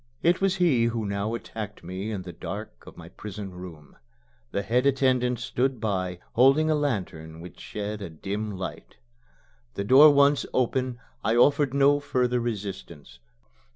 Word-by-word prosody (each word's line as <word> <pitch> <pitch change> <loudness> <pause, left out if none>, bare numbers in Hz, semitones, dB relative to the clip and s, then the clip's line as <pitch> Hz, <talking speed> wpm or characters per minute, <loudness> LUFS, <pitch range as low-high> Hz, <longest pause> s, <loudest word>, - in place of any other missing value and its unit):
It 170 +3 +3
was 195 -1 +2
he 160 -11 +3
who 115 -2 -1
now 100 +3 -2
attacked 110 -2 -7
me 95 +4 -5
in 100 -4 -4
the 90 -1 -8
dark 100 +5 -8
of - - -12
my - - -11
prison 105 -2 -8
room. 90 -5 -11 0.5
The 100 - -2
head 125 +6 +2
attendant 130 -2 +2
stood 130 +1 -1
by, 95 -5 -2 0.2
holding 135 +6 +4
a - - +3
lantern 90 - -3
which 90 +2 -11
shed 105 0 -5
a 100 - -5
dim 100 +7 -4
light. 95 - -7 0.8
The 100 - -2
door 135 +8 +8
once 140 0 +4
open, 125 0 0 0.2
I 110 - +1
offered 140 +2 +3
no 140 +1 +4
further 125 -4 0
resistance. 95 - -6
115 Hz, 155 wpm, -26 LUFS, 95-135 Hz, 0.8 s, door